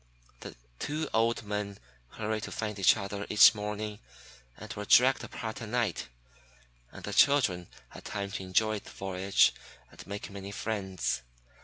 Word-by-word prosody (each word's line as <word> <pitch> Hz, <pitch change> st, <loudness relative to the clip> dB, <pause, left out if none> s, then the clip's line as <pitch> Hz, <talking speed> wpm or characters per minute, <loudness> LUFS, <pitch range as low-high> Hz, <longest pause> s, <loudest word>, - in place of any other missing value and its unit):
The -, -, -9 dB, 0.2 s
two 155 Hz, +2 st, -2 dB
old 115 Hz, +1 st, +2 dB
men 105 Hz, -1 st, -4 dB, 0.4 s
hurried 110 Hz, 0 st, -2 dB
to -, -, -8 dB
find 105 Hz, -2 st, -4 dB
each 95 Hz, -, +6 dB
other 100 Hz, 0 st, -5 dB
each 105 Hz, -, +8 dB
morning, 105 Hz, 0 st, -4 dB, 0.6 s
and -, -, -8 dB
were 105 Hz, -, -5 dB
dragged 130 Hz, +4 st, +5 dB
apart 110 Hz, +1 st, -6 dB
at 110 Hz, -, -6 dB
night; 120 Hz, -1 st, -1 dB, 0.8 s
and -, -, -11 dB
the 105 Hz, -, -4 dB
children 100 Hz, -, +4 dB, 0.2 s
had -, -, -12 dB
time 100 Hz, -1 st, -4 dB
to 100 Hz, -, -4 dB
enjoy 105 Hz, +3 st, +1 dB
the -, -, -14 dB
voyage 95 Hz, 0 st, +2 dB, 0.4 s
and -, -, -13 dB
make 100 Hz, 0 st, -6 dB
many 100 Hz, 0 st, -7 dB
friends. 100 Hz, -, -2 dB
105 Hz, 155 wpm, -30 LUFS, 100-110 Hz, 0.8 s, each